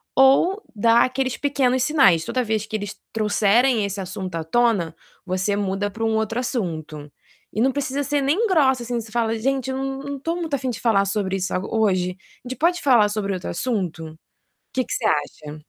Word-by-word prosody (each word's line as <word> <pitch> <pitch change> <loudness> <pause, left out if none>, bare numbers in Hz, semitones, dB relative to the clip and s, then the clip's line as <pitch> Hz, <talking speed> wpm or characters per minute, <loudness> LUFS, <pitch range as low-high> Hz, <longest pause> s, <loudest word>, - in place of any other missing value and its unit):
ou 275 +10 +4
dar 230 +2 +4
aqueles 255 -1 -2
pequenos 260 -3 +1
sinais. 260 - +4
Toda 250 +5 -1
vez 215 -1 -1
que 220 - -6
eles 205 -2 -4 0.2
trouxerem 220 +2 +3
esse 200 0 -4
assunto 185 -1 -6
à 165 - -2
tona, 185 -4 +1 0.3
você 185 +2 0
muda 200 0 -1
para 225 +3 -6
um 225 0 +1
outro 220 +2 -1
assunto. 160 - -4 0.4
E 215 - -3
não 265 +3 +3
precisa 285 0 -2
ser 285 +1 0
nem 320 +12 +2
grossa 270 - +3
assim, 240 0 -2
você 220 - -12
fala: 225 -1 0
"Gente, 265 +2 -1
eu - - -3
não 270 0 -3
não 280 -1 -5
tô 330 +5 -2
muito 330 -4 -4
afim 260 -1 -1
de 235 - -4
falar 205 -4 +2
sobre 195 -1 -1
isso 190 - -3
a 185 - +1
hoje. 185 -4 0 0.3
A - - -7
gente 260 - -5
pode 350 +2 +2
falar 235 -7 +4
sobre 205 -2 -2
outro 185 -1 -5
assunto?" 170 -8 -3 0.6
Que 255 -1 0
que - - -7
você 230 - -2
acha? 150 -2 -2
225 Hz, 205 wpm, -22 LUFS, 195-265 Hz, 0.6 s, ou